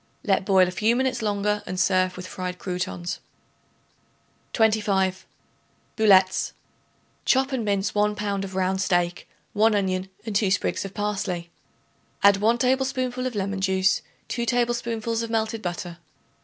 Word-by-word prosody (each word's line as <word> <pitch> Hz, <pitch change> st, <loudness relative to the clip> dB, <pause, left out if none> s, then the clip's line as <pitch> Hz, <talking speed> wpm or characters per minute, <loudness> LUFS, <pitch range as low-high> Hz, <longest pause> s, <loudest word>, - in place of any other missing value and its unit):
Let 195 Hz, -3 st, +1 dB
boil 190 Hz, -2 st, +5 dB
a -, -, -3 dB
few 215 Hz, +5 st, +2 dB
minutes 255 Hz, -1 st, 0 dB
longer 210 Hz, 0 st, 0 dB
and 185 Hz, 0 st, -3 dB
serve 185 Hz, -1 st, +2 dB
with 180 Hz, -, -7 dB
fried 180 Hz, 0 st, -5 dB
croutons. 180 Hz, -1 st, -4 dB, 1.3 s
25. 205 Hz, -4 st, +1 dB, 0.7 s
Boulettes. 190 Hz, -4 st, +4 dB, 0.7 s
Chop 265 Hz, +1 st, +2 dB
and 260 Hz, -4 st, -1 dB
mince 200 Hz, -1 st, 0 dB
1 210 Hz, 0 st, +2 dB
pound 200 Hz, -2 st, -2 dB
of 190 Hz, -1 st, -7 dB
round 190 Hz, 0 st, 0 dB
steak, 175 Hz, -3 st, 0 dB, 0.2 s
1 220 Hz, +1 st, +3 dB
onion 190 Hz, -1 st, -1 dB, 0.2 s
and 220 Hz, -3 st, -4 dB
2 200 Hz, -1 st, +3 dB
sprigs 190 Hz, -, 0 dB
of 195 Hz, -, -8 dB
parsley. 190 Hz, -5 st, -3 dB, 0.7 s
Add 200 Hz, 0 st, +7 dB
1 225 Hz, +4 st, +2 dB
tablespoonful 255 Hz, 0 st, 0 dB
of 250 Hz, -, -5 dB
lemon 195 Hz, -1 st, -2 dB
juice, 190 Hz, 0 st, +2 dB, 0.3 s
2 235 Hz, -1 st, -2 dB
tablespoonfuls 235 Hz, -2 st, 0 dB
of 230 Hz, -, -4 dB
melted 220 Hz, 0 st, -1 dB
butter. 175 Hz, -1 st, -5 dB
200 Hz, 140 wpm, -25 LUFS, 185-225 Hz, 1.3 s, Add